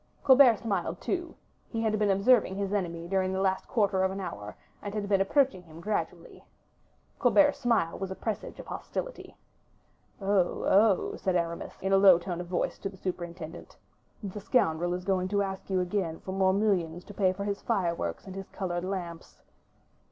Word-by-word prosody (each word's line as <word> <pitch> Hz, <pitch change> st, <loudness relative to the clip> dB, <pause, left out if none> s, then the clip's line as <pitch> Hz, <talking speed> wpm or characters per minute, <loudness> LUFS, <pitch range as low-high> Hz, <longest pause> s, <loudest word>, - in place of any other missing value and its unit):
Colbert 260 Hz, -4 st, +7 dB
smiled 195 Hz, -6 st, -2 dB
too; 345 Hz, -2 st, -3 dB, 0.3 s
he 225 Hz, -1 st, -2 dB
had 215 Hz, -1 st, +1 dB
been 210 Hz, -1 st, +2 dB
observing 200 Hz, +1 st, +4 dB
his 200 Hz, 0 st, -2 dB
enemy 170 Hz, -4 st, -2 dB
during 190 Hz, 0 st, 0 dB
the 190 Hz, -, -1 dB
last 190 Hz, -1 st, 0 dB
quarter 200 Hz, -5 st, +1 dB
of 190 Hz, -, +2 dB
an 195 Hz, +1 st, -5 dB
hour, 105 Hz, -, -6 dB, 0.2 s
and 205 Hz, 0 st, -6 dB
had 205 Hz, -1 st, -2 dB
been 195 Hz, -1 st, +3 dB
approaching 255 Hz, -1 st, +2 dB
him 165 Hz, -2 st, -14 dB
gradually. 170 Hz, -3 st, -4 dB, 0.8 s
Colbert's 290 Hz, -1 st, +4 dB
smile 230 Hz, -10 st, +1 dB
was 195 Hz, 0 st, -3 dB
a 190 Hz, -, -5 dB
presage 220 Hz, 0 st, -5 dB
of -, -, -8 dB
hostility. -, -, -6 dB, 0.8 s
"Oh, 195 Hz, -3 st, +1 dB
oh!" 200 Hz, -1 st, +3 dB
said 185 Hz, -1 st, -1 dB
Aramis, 170 Hz, -1 st, -2 dB
in 195 Hz, 0 st, +1 dB
a -, -, +7 dB
low 195 Hz, -3 st, +8 dB
tone 175 Hz, 0 st, -4 dB
of 175 Hz, -, -8 dB
voice 175 Hz, 0 st, -2 dB
to 195 Hz, -, -3 dB
the 190 Hz, -, -14 dB
superintendent; 175 Hz, -3 st, -6 dB, 0.5 s
"the 200 Hz, +1 st, -5 dB
scoundrel 175 Hz, -6 st, +1 dB
is 180 Hz, 0 st, -6 dB
going 185 Hz, -1 st, +1 dB
to 200 Hz, +1 st, +1 dB
ask 190 Hz, 0 st, -6 dB
you 190 Hz, -1 st, +1 dB
again 180 Hz, -3 st, -2 dB
for 190 Hz, -, -6 dB
more 190 Hz, 0 st, +3 dB
millions 185 Hz, -4 st, 0 dB
to 205 Hz, -, -11 dB
pay 190 Hz, -2 st, +2 dB
for 195 Hz, +2 st, -5 dB
his 200 Hz, 0 st, -3 dB
fireworks 170 Hz, -, -1 dB
and 190 Hz, -, -8 dB
his 195 Hz, 0 st, -7 dB
colored 175 Hz, -2 st, -3 dB
lamps." 180 Hz, -3 st, -6 dB
190 Hz, 185 wpm, -29 LUFS, 175-205 Hz, 0.8 s, low